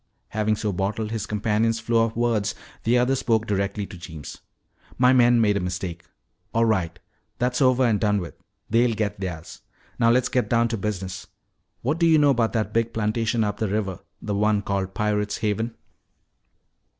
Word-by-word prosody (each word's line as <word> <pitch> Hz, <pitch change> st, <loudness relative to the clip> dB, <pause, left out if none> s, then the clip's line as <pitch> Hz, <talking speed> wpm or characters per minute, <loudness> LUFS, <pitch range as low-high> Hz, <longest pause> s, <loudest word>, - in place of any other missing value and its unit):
Having 110 Hz, 0 st, 0 dB
so 105 Hz, 0 st, -2 dB
bottled 105 Hz, +4 st, -2 dB
his 110 Hz, -3 st, -3 dB
companion's 110 Hz, +2 st, +1 dB
flow 115 Hz, 0 st, +2 dB
of 115 Hz, -, -5 dB
words, 115 Hz, -3 st, 0 dB, 0.3 s
the 120 Hz, +2 st, +4 dB
other 125 Hz, +2 st, +2 dB
spoke 115 Hz, -4 st, +1 dB
directly 100 Hz, 0 st, -1 dB
to 95 Hz, -, -11 dB
Jeems. 80 Hz, -4 st, -9 dB, 0.6 s
"My 125 Hz, 0 st, +5 dB
men 120 Hz, -1 st, +5 dB
made 105 Hz, -2 st, +3 dB
a -, -, 0 dB
mistake. 90 Hz, -1 st, -4 dB, 0.5 s
All 115 Hz, 0 st, +4 dB
right. 90 Hz, -6 st, 0 dB, 0.4 s
That's 125 Hz, +2 st, 0 dB
over 130 Hz, -1 st, +4 dB
and 110 Hz, -4 st, +2 dB
done 105 Hz, -2 st, +2 dB
with; 85 Hz, -3 st, -6 dB, 0.3 s
they'll 115 Hz, +1 st, +2 dB
get 105 Hz, -3 st, -2 dB
theirs. 90 Hz, -4 st, -6 dB, 0.4 s
Now 115 Hz, -1 st, +4 dB
let's 125 Hz, +1 st, +3 dB
get 125 Hz, -1 st, 0 dB
down 115 Hz, 0 st, +3 dB
to 115 Hz, -, -1 dB
business. 95 Hz, -2 st, -4 dB, 0.6 s
What 145 Hz, +7 st, 0 dB
do 170 Hz, -, +4 dB
you 160 Hz, -1 st, +6 dB
know 145 Hz, -2 st, +5 dB
about 115 Hz, -3 st, +1 dB
that 110 Hz, -2 st, -1 dB
big 115 Hz, 0 st, 0 dB
plantation 110 Hz, +1 st, 0 dB
up 105 Hz, 0 st, -3 dB
river, 100 Hz, -3 st, -1 dB, 0.2 s
the 105 Hz, -, -4 dB
one 105 Hz, 0 st, +2 dB
called 95 Hz, -1 st, -2 dB
'Pirate's 105 Hz, -1 st, 0 dB
Haven'?" 110 Hz, +2 st, -2 dB
110 Hz, 175 wpm, -24 LUFS, 100-115 Hz, 0.6 s, you